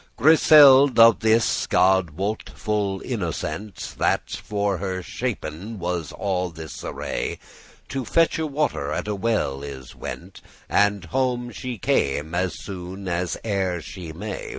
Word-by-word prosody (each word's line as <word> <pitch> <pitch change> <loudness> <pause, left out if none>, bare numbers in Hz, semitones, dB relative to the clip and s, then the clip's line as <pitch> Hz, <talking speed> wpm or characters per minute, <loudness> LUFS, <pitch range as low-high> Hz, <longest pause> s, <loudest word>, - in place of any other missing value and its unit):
Griseld' 145 -2 +7
of 115 -1 +7
this 110 +1 +2
(God 95 -2 +3
wot) 100 +8 -4
full 100 -3 -1
innocent, 100 - -4
That - - +1
for 100 -3 -2
her 95 -1 -3
shapen* 105 -3 -5
was 90 -3 -3
all 90 -3 -2
this 80 -1 -9
array, - - -3
*prepared - - -23
To 135 -2 -3
fetche 160 +1 +2
water 150 +2 -1
at - - -3
a 105 - -1
well 100 -10 -1
is 65 -3 -8
went, 90 +2 -8 0.3
And 100 -2 +2
home 125 +4 -1
she 125 -2 -6
came 75 -3 0
as 90 +1 -1
soon 95 0 -7
as 85 0 -1
e'er 95 -4 0
she 85 0 -8
may. - - -6
100 Hz, 140 wpm, -23 LUFS, 90-115 Hz, 0.3 s, Griseld